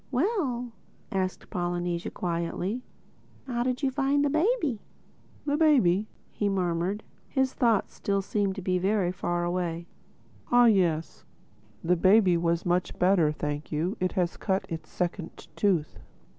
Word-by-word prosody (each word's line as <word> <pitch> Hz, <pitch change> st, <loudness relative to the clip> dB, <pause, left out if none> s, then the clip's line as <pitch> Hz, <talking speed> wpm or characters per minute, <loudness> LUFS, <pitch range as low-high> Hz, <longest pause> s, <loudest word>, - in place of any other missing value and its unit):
"Well," 260 Hz, -, 0 dB, 0.4 s
asked 185 Hz, -1 st, -3 dB
Polynesia 175 Hz, -1 st, -2 dB
quietly, 175 Hz, +6 st, -2 dB, 0.6 s
"how 240 Hz, -3 st, -2 dB
did 255 Hz, +2 st, -1 dB
you 270 Hz, -, +2 dB
find 280 Hz, +1 st, +2 dB
the 285 Hz, -, +1 dB
baby?" 310 Hz, -, +1 dB, 0.7 s
"The 290 Hz, 0 st, +1 dB
baby?" 220 Hz, -, +4 dB, 0.2 s
he 205 Hz, -, -1 dB
murmured—his 195 Hz, +8 st, -2 dB
thoughts 230 Hz, -6 st, +1 dB
still 200 Hz, -1 st, -1 dB
seemed 200 Hz, -1 st, -1 dB
to 195 Hz, -, -6 dB
be 185 Hz, 0 st, +1 dB
very 190 Hz, -1 st, +1 dB
far 175 Hz, -1 st, -2 dB
away—"Ah 175 Hz, +7 st, -1 dB
yes. 175 Hz, -8 st, +2 dB, 0.6 s
The 180 Hz, +2 st, +2 dB
baby 190 Hz, +1 st, +5 dB
was 170 Hz, 0 st, 0 dB
much 180 Hz, +1 st, 0 dB
better, 180 Hz, -4 st, +4 dB
thank 150 Hz, 0 st, -4 dB
you—It 180 Hz, +4 st, -1 dB
has 175 Hz, -2 st, 0 dB
cut 190 Hz, -1 st, -1 dB
its 160 Hz, -1 st, -6 dB
second 175 Hz, -1 st, -4 dB
tooth." 180 Hz, -7 st, 0 dB
190 Hz, 130 wpm, -27 LUFS, 175-240 Hz, 0.7 s, baby